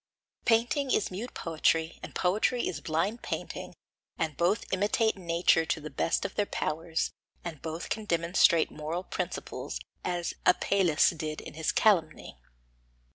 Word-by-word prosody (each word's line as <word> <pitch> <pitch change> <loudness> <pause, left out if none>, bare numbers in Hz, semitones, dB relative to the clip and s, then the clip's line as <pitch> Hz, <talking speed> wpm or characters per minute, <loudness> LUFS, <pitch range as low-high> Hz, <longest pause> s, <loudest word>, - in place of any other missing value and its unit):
Painting 240 +5 +2
is 215 - +1
mute 215 +7 -6
poetry, 165 0 +1
and - - -9
poetry 210 +6 +1
is 150 -4 -4
blind 190 +9 -1
painting, - - -5 0.4
and 160 -3 -1
both 180 +5 +1
imitate 210 +3 +2
nature 170 -2 +3
to 160 0 -1
the 155 -1 -8
best 165 - 0
of - - -3
their 205 - 0
powers, 160 +1 -1 0.3
and 160 -5 -6
both 160 +1 -5
can 220 -1 -2
demonstrate 170 -2 +3
moral 155 +4 -4
principles, - - -4 0.2
as 175 -1 -2
Apelles 180 -3 +4
did 155 -2 -4
in - - -9
his 160 0 0
Calumny. 170 - +2
170 Hz, 140 wpm, -29 LUFS, 160-200 Hz, 0.4 s, Apelles